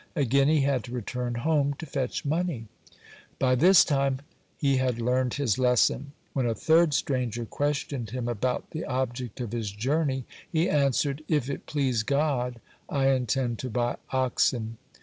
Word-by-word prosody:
Again 140 -2 +3
he 155 -1 +4
had 135 -3 +1
to 120 - -9
return 125 0 -3
home 145 +2 +1
to 160 - -8
fetch 135 -4 -3
money. 155 -5 -1 0.7
By 130 -1 +2
this 175 +7 +6
time 135 -2 +1 0.4
had 130 -4 +1
learned 125 +1 +1
his 130 -5 0
lesson. 130 +3 +2 0.2
When 130 -3 0
a 115 - 0
third 160 +1 +4
stranger 125 -4 -1
questioned 140 -3 -2
him 125 +1 -3
about 120 +2 -2
the 160 - -4
object 125 -2 -3
of 120 -4 -4
his 115 -3 -2
journey, 130 +5 -1 0.3
he 165 +1 +2
answered: 140 0 +1
"If 145 -4 0
it - - -6
please 130 -6 +1
God, 125 -2 0 0.3
I 135 -1 +2
intend 125 -2 0
to 130 - -4
buy 120 +1 -1
oxen." 120 -3 0
130 Hz, 155 wpm, -27 LUFS, 120-145 Hz, 0.7 s, this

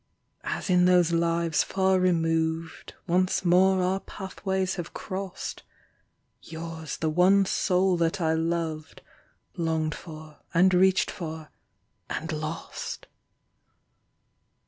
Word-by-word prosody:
As - - -3
in 180 -2 +4
those 180 -2 +4
lives 170 -1 +1
far 190 -1 +1
removed, 165 -2 0
Once 185 +2 +1
more 185 +1 +4
our 185 +2 +1
pathways 190 -1 -3
have 175 -2 -6
crossed. 190 -1 -5 0.8
Yours 160 -1 -7
the 160 - -1
one 190 +4 +4
soul 185 -1 +2
that 170 +3 0
I 160 -2 +1
loved, 160 -1 -3 0.5
Longed 160 -2 0
for 155 -2 -11 0.2
and 185 +2 +5
reached 190 +2 +3
for... 160 -4 -7 0.6
and 165 +3 -4
lost 155 +1 -5
170 Hz, 105 wpm, -27 LUFS, 160-185 Hz, 0.8 s, and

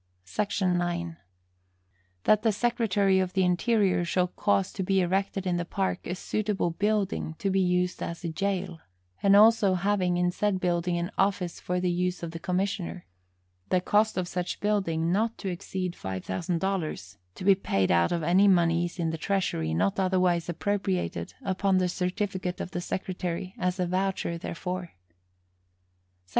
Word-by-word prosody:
SEC. 145 - -2
9. 175 -2 0 1.1
That 215 -1 +4
the 225 - +3
Secretary 210 -4 +2
of 185 -1 -1
the 190 - +2
Interior 185 +1 +2
shall 180 +1 +1
cause 195 0 0
to - - -4
be 195 +1 +2
erected 190 +1 0
in 180 -1 +1
the 175 - -1
Park 190 +1 -2
a 180 - -2
suitable 205 -2 -1
building 200 -3 -1
to 195 - -1
be 195 - +2
used 180 0 +1
as 170 0 -5
a - - -1
jail, 185 0 -2 0.4
and 200 0 +5
also 215 -2 +6
having 185 -1 +1
in 175 0 +2
said 205 0 0
building 175 -1 0
an 170 +1 -2
office 195 -3 0
for 180 0 -2
the 180 0 +1
use 180 0 -1
of 165 - -4
the 165 - -6
commissioner; 185 0 -2 0.6
the 185 - +3
cost 210 +4 +2
of 180 -1 -1
such 180 0 -3
building 170 -6 0
not 220 +4 +1
to 195 - -4
exceed 180 0 -4
five 95 -1 -5
thousand 175 -1 -2
dollars, 160 - -3 0.2
to - - -8
be 195 +1 +7
paid 95 - 0
out 85 -1 +3
of 170 -2 -1
any 185 +5 +4
moneys 170 -2 +2
in 165 -2 0
the 160 - -5
Treasury 180 - -1
not 95 - +1
otherwise 185 -2 +2
appropriated 185 - -2
upon 190 0 +1
the 185 -1 +2
certificate 180 0 -2
of - - -5
the 175 - -3
Secretary 180 0 -4
as 180 +1 -1
a 180 - +2
voucher 185 -1 -1
therefor. 180 +1 -5
180 Hz, 165 wpm, -27 LUFS, 175-195 Hz, 1.1 s, be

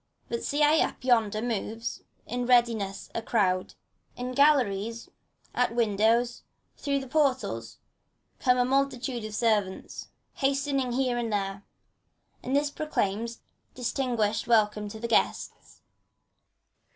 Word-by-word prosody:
But 235 0 -3
see 295 +1 +1
I 305 +2 +5
up - - -5
yonder 225 -4 +2
moves 225 0 -3 0.2
in 245 0 -3
readiness 230 -5 +2
a 230 - -2
crowd: 185 -5 0 0.4
In 250 +1 -4
galleries, 235 -6 +2 0.4
at 245 -2 +1
windows, 230 +2 +2 0.3
through 280 -1 -1
the 265 - -8
portals, 260 - 0 0.6
comes 250 -2 +3
A - - +3
multitude 260 -2 0
of 215 -1 -6
servants, 210 -5 -1 0.3
hastening 275 -2 0
here 250 -1 +1
and 230 -2 -2
there; 195 -1 -2 0.8
And 260 +2 -2
this 290 0 +2
proclaims 230 -6 -2 0.3
distinguished 235 -4 -1
welcome 210 -2 +2
to 220 +1 -8
the 235 - -3
guest. - - +1
CHORUS. - - -23
235 Hz, 125 wpm, -28 LUFS, 215-260 Hz, 0.8 s, I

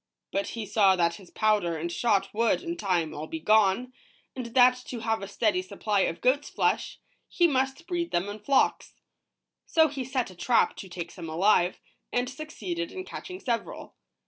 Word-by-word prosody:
But 195 0 -1
he 225 - -3
saw 195 -2 +4
that 170 -1 +1
his 185 -3 -15
powder 205 -6 +1
and 170 +2 -3
shot 195 -1 +1
would, 230 - +1
in 340 -1 -3
time, 180 - 0
all 155 +2 -6
be 160 - -5
gone, 215 +6 +3 0.4
and 255 -2 -5
that 250 +1 +5
to 240 -3 -5
have 225 -1 -1
a 195 - -5
steady 200 -2 +1
supply 200 +2 -1
of 175 - 0
goat's 285 +3 +2
flesh, - - 0 0.3
he 350 - +3
must 270 +1 0
breed 345 -1 -2
them 175 +3 0
in 205 +1 -6
flocks. 270 +6 +1 0.7
So 320 -1 +4
he 275 -2 -4
set 255 -4 -2
a - - -14
trap 230 +7 +2
to 190 - -8
take 175 -1 -6
some 170 -3 -8
alive, 180 +2 +2 0.3
and 245 0 0
succeeded 220 - -5
in 370 0 -6
catching 370 -1 -8
several. 235 -7 -4
215 Hz, 185 wpm, -27 LUFS, 185-260 Hz, 0.7 s, that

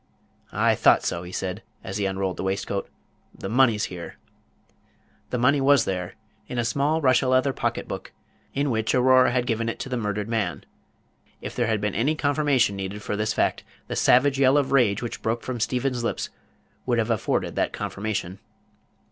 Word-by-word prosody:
"I - - +3
thought - - +4
so," 85 - -2
he 90 0 -9
said, 95 +2 -4 0.2
as 95 - -4
he 100 -1 0
unrolled 95 -1 -2
the - - -4
waistcoat; 100 +1 -2 0.5
"the - - -5
money's 115 -1 +3
here." 90 -2 -6 1.1
The 125 - -1
money 135 +4 +3
was 140 -1 +5
there, 90 -2 -3 0.3
in 125 - -5
a 120 - +1
small 140 +7 +1
Russia 130 -1 +3
leather 130 +1 +3
pocket - - -2
book, - - -6 0.4
in 140 0 +1
which 110 +1 0
Aurora 130 0 +5
had 125 -1 0
given 115 -1 -1
it - - -4
to - - -5
the 125 - -1
murdered 105 -2 -2
man. 110 -6 -2 0.7
If - - -7
there 120 -2 +1
had 110 -2 0
been 105 -1 -1
any 140 +9 +1
confirmation 145 -7 +2
needed 100 +1 -5
for - - -2
this 105 +1 0
fact, - - 0 0.3
the - - -2
savage 135 +2 +4
yell 135 +1 +5
of 140 -2 +1
rage 120 -6 +3
which 120 - -5
broke 115 +1 -1
from 125 -2 -4
Stephen's 125 +1 -1
lips 115 - -2 0.6
would 120 -2 +2
have 115 0 +1
afforded 110 - -1
that - - 0
confirmation. 100 -3 -4
115 Hz, 185 wpm, -25 LUFS, 100-130 Hz, 1.1 s, was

